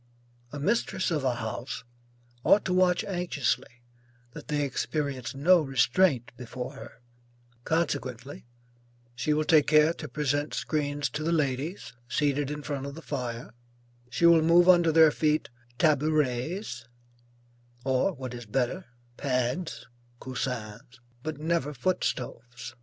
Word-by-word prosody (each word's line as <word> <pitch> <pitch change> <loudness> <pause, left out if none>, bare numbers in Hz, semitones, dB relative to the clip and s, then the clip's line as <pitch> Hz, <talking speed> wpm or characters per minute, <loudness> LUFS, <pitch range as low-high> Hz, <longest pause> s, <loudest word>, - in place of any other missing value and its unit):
A 145 - -6
mistress 190 +1 0
of 150 -4 0
a 130 -2 +1
house 120 +1 -5 0.6
ought 205 - +5
to 185 - 0
watch 180 -1 +3
anxiously 155 - -2 0.5
that - - -11
they 145 -1 0
experience 140 -2 -3
no 170 +5 +5
restraint 135 0 +2
before 125 0 -6
her; - - -12 0.6
consequently, 135 -6 -2 0.7
she 125 +5 -1
will 150 +1 +2
take 155 -2 +4
care 155 +1 +5
to 155 - -8
present 145 +2 -1
screens 145 -2 -1
to 150 - -4
the 160 +2 0
ladies 140 -2 -1 0.2
seated 145 -1 0
in 150 0 -5
front 140 -2 -4
of 140 - -7
the 165 - -10
fire; 125 -5 -5 0.6
she 125 +8 +1
will 170 -1 +7
move 170 +2 +5
under 175 -3 +6
their 160 -1 +7
feet 155 -2 0 0.3
tabourets, 150 - 0 1.0
or 130 +8 +2
what 130 -4 -7
is 120 -2 -8
better, 135 - -1 0.3
pads, 130 +5 -2 0.3
(coussins) 125 -1 -5 0.2
but 155 +1 -4
never 155 -2 -1
foot 180 +9 0
stoves. 120 -2 -4
145 Hz, 130 wpm, -28 LUFS, 125-160 Hz, 1.0 s, will